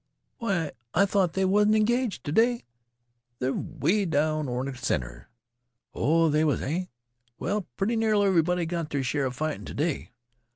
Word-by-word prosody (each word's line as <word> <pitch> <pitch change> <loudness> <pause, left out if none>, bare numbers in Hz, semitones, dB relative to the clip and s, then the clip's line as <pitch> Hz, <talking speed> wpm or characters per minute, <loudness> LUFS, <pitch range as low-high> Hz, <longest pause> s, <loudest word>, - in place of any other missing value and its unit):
Why, 190 -9 -1 0.2
I 200 +4 +5
thought 190 -4 +1
they 190 +1 +1
wasn't 210 +3 +4
engaged 235 0 +1
t' 145 - -4
day 235 +7 +3 0.7
they 130 +1 -1
're - - +1
'way 180 +5 0
over 145 -4 0
in 140 - -4
th' 125 - -11
center. - - -2 0.6
Oh, 165 +2 +3
they 155 0 +2
was, 150 -3 +2
eh? 170 +7 -1 0.5
Well, 200 +2 -2
pretty 220 +4 0
nearly 215 -2 +2
everybody 180 -2 +2
got 165 -2 -3
their 140 -2 -1
share 135 +1 0
'a - - -3
fightin' 155 +5 -3
t' - - -8
day. 155 +1 -1
165 Hz, 170 wpm, -27 LUFS, 145-200 Hz, 0.7 s, I